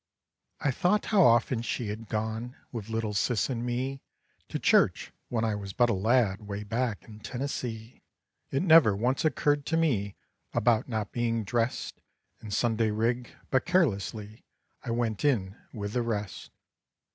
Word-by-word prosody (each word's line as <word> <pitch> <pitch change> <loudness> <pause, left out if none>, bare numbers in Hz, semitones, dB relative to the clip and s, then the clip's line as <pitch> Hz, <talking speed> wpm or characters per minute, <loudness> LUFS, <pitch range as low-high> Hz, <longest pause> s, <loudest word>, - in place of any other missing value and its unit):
I 145 - +1
thought 185 +10 +1
how 200 - +6
often 120 -3 +4
she 115 -2 -3
had 110 +2 -6
gone 110 +3 -3 0.2
With 115 -3 -6
little 110 -1 -2
Sis 105 +4 +1
and 120 -2 -2
me 130 +3 -2 0.5
To - - -2
church, - - +3 0.2
when 115 -2 0
I 110 - 0
was 100 -2 -5
but 120 -1 +3
a - - +2
lad 110 0 +2
Way 100 0 -4
back 115 +1 -2
in 110 -1 -13
Tennessee. 120 0 -5 0.5
It 135 - 0
never 160 - +7
once 125 +6 0
occurred 145 -2 +2
to 165 - +1
me 110 -12 +1 0.4
About 115 +1 +2
not 110 -3 -2
being 115 -2 0
dressed 115 - -2 0.4
In 110 - -8
Sunday 110 +1 +1
rig, 115 +3 0 0.2
but 130 - +2
carelessly 110 - 0 0.4
I 125 - -6
went 115 -2 -1
in 105 -10 +1 0.2
with 105 -2 -5
the 125 - +1
rest. 105 -4 -4
115 Hz, 160 wpm, -28 LUFS, 105-125 Hz, 0.5 s, never